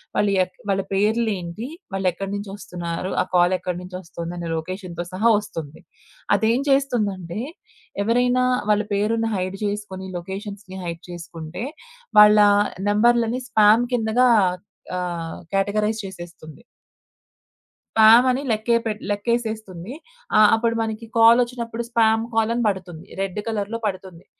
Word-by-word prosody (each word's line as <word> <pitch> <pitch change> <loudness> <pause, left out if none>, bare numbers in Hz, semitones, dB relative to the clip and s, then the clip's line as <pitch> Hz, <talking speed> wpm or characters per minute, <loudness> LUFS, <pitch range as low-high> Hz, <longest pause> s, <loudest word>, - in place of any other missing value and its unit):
వాళ్ళు 205 -1 +2
ఎక్ 180 0 -10
వాళ్ళ 195 0 +2
పేర్లేంటి? 210 0 -1 0.3
వాళ్ళు 195 -1 0
ఎక్కడినుంచి 195 +3 -5
ఒస్తున్నారు? 175 -2 -5
ఆ - - +2
కాల్ 175 +1 +4
ఎక్కడినుంచి 180 0 -6
ఒస్తోంది? 170 -1 -7
అనే 170 -1 -5
లొకేషన్‌తో 175 +1 -5
సహా 220 +5 +2
ఒస్తుంది. 165 -8 -8 0.5
అదేం 230 +3 +2
చేస్తుందంటే 210 -10 0 0.6
ఎవరైనా 245 +3 +2 0.3
వాళ్ళ 210 0 +2
పేరుని 225 +3 0
హైడ్ 185 +1 -3
జేసుకొని, 200 -2 -4
లొకేషన్స్‌ని 190 +1 -7
హైడ్ 170 -1 -5
జేసుకుంటే 165 +1 -7 0.6
వాళ్ళ 210 0 +8 0.5
నంబర్‌లని 235 +3 +2
స్పామ్ 215 +2 +5
కిందగా 235 +2 +3 0.7
ఆహ్, 170 -2 -4
కేటగరైజ్ 210 +2 0
చేసేస్తుంది. 175 -4 -10 1.3
స్పామ్ 225 +3 +8
అని 255 - -1
లెక్కే 220 +2 +1
పె 220 - 0 0.2
లెక్కేసేస్తుంది. 220 -2 -3 0.4
ఆ! - - +7 0.2
అప్పుడు 230 0 0
మనకి 225 0 -4
కాల్ 230 +2 +7
ఒచ్చినప్పుడు 235 -1 -5
స్పామ్ 225 -1 +3
కాల్ 225 0 +2
అని 240 - 0
బడుతుంది. 180 -5 -4
రెడ్ 195 +1 -3
కలర్‌‌లో 220 +1 -2
పడుతుంది 185 -3 -7
205 Hz, 120 wpm, -22 LUFS, 180-225 Hz, 1.3 s, వాళ్ళ